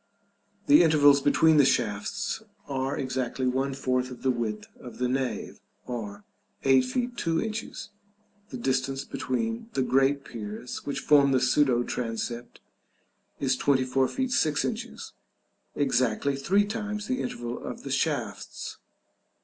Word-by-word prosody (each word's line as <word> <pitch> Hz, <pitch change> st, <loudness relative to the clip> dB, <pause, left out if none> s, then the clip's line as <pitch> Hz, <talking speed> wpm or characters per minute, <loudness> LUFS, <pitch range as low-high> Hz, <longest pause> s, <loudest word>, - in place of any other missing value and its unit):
The 295 Hz, 0 st, +7 dB
intervals 145 Hz, -4 st, +6 dB
between 155 Hz, +2 st, +4 dB
the 145 Hz, -, +7 dB
shafts 110 Hz, -6 st, 0 dB, 0.3 s
are 135 Hz, -1 st, -2 dB
exactly 130 Hz, -1 st, -2 dB
one 135 Hz, +2 st, 0 dB
fourth 130 Hz, -1 st, 0 dB
of 125 Hz, -, -10 dB
the 130 Hz, -, +3 dB
width 115 Hz, -3 st, -3 dB
of 120 Hz, -, -10 dB
the 125 Hz, -, 0 dB
nave, 130 Hz, 0 st, -2 dB, 0.3 s
or 105 Hz, -4 st, -6 dB, 0.4 s
8 135 Hz, -1 st, +5 dB
feet 240 Hz, -, -2 dB
2 165 Hz, -1 st, 0 dB
inches, 220 Hz, 0 st, -4 dB, 0.5 s
and 205 Hz, -, -37 dB
the -, -, -10 dB
distance 135 Hz, +1 st, 0 dB
between 225 Hz, -, -3 dB
the 130 Hz, -, +1 dB
great 135 Hz, +2 st, +2 dB
piers 110 Hz, +1 st, -6 dB
which 140 Hz, -, -2 dB
form 140 Hz, -2 st, +5 dB
the 130 Hz, -, +4 dB
pseudo 125 Hz, -1 st, +3 dB
transept 120 Hz, 0 st, -4 dB, 0.8 s
is 135 Hz, -2 st, +2 dB
24 130 Hz, -1 st, +2 dB
feet 260 Hz, -, -2 dB
6 155 Hz, -10 st, +2 dB
inches, 235 Hz, +1 st, -5 dB, 0.6 s
exactly 135 Hz, 0 st, +1 dB
three 190 Hz, +9 st, +2 dB
times 210 Hz, -1 st, -4 dB
the 255 Hz, +2 st, -1 dB
interval 120 Hz, -, -5 dB
of -, -, -6 dB
the -, -, -5 dB
shafts. -, -, -2 dB
135 Hz, 140 wpm, -27 LUFS, 125-155 Hz, 0.8 s, The